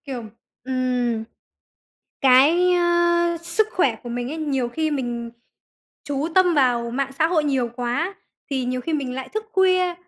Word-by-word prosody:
Kiểu, 260 -4 -5 0.4
ừm, 250 -3 -1 1.0
cái, 295 +8 +5
ơ, 345 -1 +2
sức 345 +6 +1
khỏe 270 -11 +2
của 240 - -8
mình 240 +1 -3
ấy, 310 - -4
nhiều 275 -6 -1
khi 315 +6 -2
mình 240 -4 -3 0.7
chú 285 +1 -2
tâm 365 -2 +4
vào 245 -4 +2
mạng 270 +2 -2
xã 320 - +4
hội 325 -2 +1
nhiều 265 -4 0
quá 260 +10 -2 0.4
thì 265 -2 -1
nhiều 250 0 -2
khi 325 +6 -4
mình 275 -5 -2
lại 260 0 -5
thức 435 +1 -4
khuya, 370 -2 +3
275 Hz, 160 wpm, -22 LUFS, 250-345 Hz, 1.0 s, cái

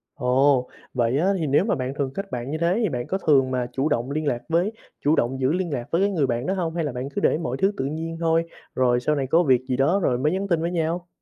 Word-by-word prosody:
Ồ. 130 -1 +2 0.2
Vậy 120 0 +1
á 185 +6 +2
thì 160 - -1
nếu 145 +7 +3
mà 225 - +1
bạn 130 -2 -3
thường 135 -2 -2
kết 195 +4 -6
bạn 125 +2 -4
như 155 - -2
thế 170 +6 +1
thì 210 - +2
bạn 120 -4 -4
có 190 - -1
thường 135 -4 +4
mà 125 -1 -1
chủ 135 +3 0
động 130 -1 -1
liên 155 +1 -2
lạc 125 -4 0
với 175 +5 +2 0.3
chủ 150 +2 +4
động 130 -1 0
giữ 130 +1 +2
liên 175 -2 -1
lạc 120 -3 -3
với 170 - +2
cái 200 - +3
người 150 -7 +1
bạn 120 +1 -2
đó 190 - 0
hông, 170 -4 -2
hay 170 - 0
là 145 - -2
bạn 125 +2 -5
cứ - - -1
để - - +3
mọi 130 -6 -3
thứ 195 +7 +2
tự 130 - -1
nhiên 160 +3 -4
thôi, 165 0 +2 0.3
rồi 125 -1 +3
sau 150 +5 0
này 135 -2 -1
có 165 +6 +4
việc 130 -5 +3
gì 130 -2 -1
đó 160 +9 +3
rồi 125 - +2
mới 150 +5 +1
nhắn 190 +2 -2
tin 170 -4 +1
với 170 - -1
nhau? 170 +1 -2
145 Hz, 300 wpm, -24 LUFS, 130-170 Hz, 0.3 s, thường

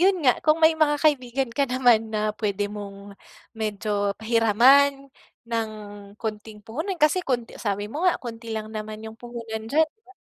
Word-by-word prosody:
'yon 380 +1 +4
nga, 250 - +4
kung 305 0 +3
may 320 - +7
mga 305 -2 +2
kaibigan 270 -4 +1
ka 275 +2 0
naman 245 -3 +3
na 215 0 0
pwede 205 -1 -1
mong 200 -1 -8 0.4
medyo 210 -2 -2
pahiraman 255 +5 +4 0.3
ng 230 -1 -2 0.5
konting 215 -1 -6
puhunan 320 - -4
kasi 305 +4 +3
konti 245 -8 -2
sabi 205 -2 -2
mo 320 +9 -1
nga, - - +2
konti 230 -3 -8
lang 215 0 -5
naman 215 0 -6
yung 220 0 -9
puhunan 225 -2 -6
diyan, 315 +4 +4
'di 440 - -47
ba? - - -15
230 Hz, 170 wpm, -24 LUFS, 215-280 Hz, 0.5 s, may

